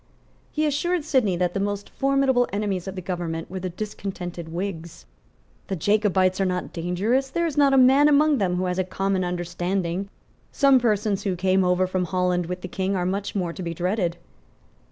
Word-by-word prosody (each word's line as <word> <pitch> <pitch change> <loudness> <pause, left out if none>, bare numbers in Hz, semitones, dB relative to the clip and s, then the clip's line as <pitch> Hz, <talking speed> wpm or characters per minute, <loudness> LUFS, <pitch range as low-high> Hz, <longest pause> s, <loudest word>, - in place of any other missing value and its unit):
He 310 0 0
assured 305 +3 0
Sidney 255 - +2
that 175 0 0
the 195 - -1
most 205 0 -2
formidable 270 -2 +2
enemies 200 -3 -2
of 190 - -5
the 185 - -6
government 170 -2 -4
were 190 - -4
the 185 0 -3
discontented 180 -3 -6
Whigs. 170 - -5 0.6
"The 195 - -2
Jacobites 190 0 +2
are - - +2
not 180 -1 -2
dangerous. 200 +11 0
There 340 +4 0
is 320 -4 -2
not 285 -1 +4
a 270 - +4
man 265 +3 +6
among 300 -1 +4
them 180 -3 +1
who 185 +1 -1
has 180 0 -1
common 195 0 0
understanding. 175 +1 -2 0.4
Some 275 -2 +5
persons 210 -4 +1
who 195 -2 -1
came 190 +1 +2
over 180 +1 +2
from 185 0 -1
Holland 180 -1 0
with 180 +1 -5
the - - -5
King 190 +2 -2
are 180 -1 -1
much 195 +3 -2
more 180 -4 -1
to 190 - -8
be 170 -1 -4
dreaded." 180 0 -1
190 Hz, 190 wpm, -24 LUFS, 180-220 Hz, 0.6 s, man